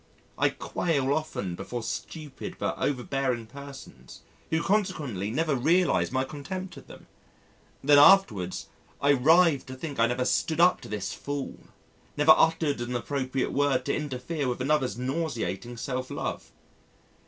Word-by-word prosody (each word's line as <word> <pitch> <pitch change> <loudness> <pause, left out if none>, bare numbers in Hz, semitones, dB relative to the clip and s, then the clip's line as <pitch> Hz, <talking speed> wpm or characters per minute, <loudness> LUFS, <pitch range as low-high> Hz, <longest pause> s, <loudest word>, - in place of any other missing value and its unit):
I - - +2
quail 140 -5 -1
often 150 - -3
before 110 +6 -5
stupid 150 +4 -6
but - - -2
over 130 -4 -1
bearing 130 -4 -1
persons 140 +3 -12 0.3
who 160 +1 0
consequently 145 - -1
never 155 +4 0
realise 170 +8 +2
my 130 0 +1
contempt 165 +8 -6
of - - -13
them. - - -13 0.8
Then 145 +1 +6
afterwards, 130 - +5 0.3
I 140 - +3
writhe 155 +2 +4
to 130 - -7
think 140 0 -6
I 115 - +5
never 125 +1 -1
stood 160 +5 0
up 180 +1 +5
to - - -10
this 105 -2 -3
fool; 145 -1 -5 0.6
never 150 +2 +8
uttered 160 -5 +2
an 120 +1 -3
appropriate 130 +1 -2
word 140 -3 +1
to 140 - 0
interfere 145 +1 -3
with 125 0 -2
another's 130 -5 0
nauseating 125 - -3
self 130 +1 -4
love. - - -5
140 Hz, 145 wpm, -27 LUFS, 125-155 Hz, 0.8 s, never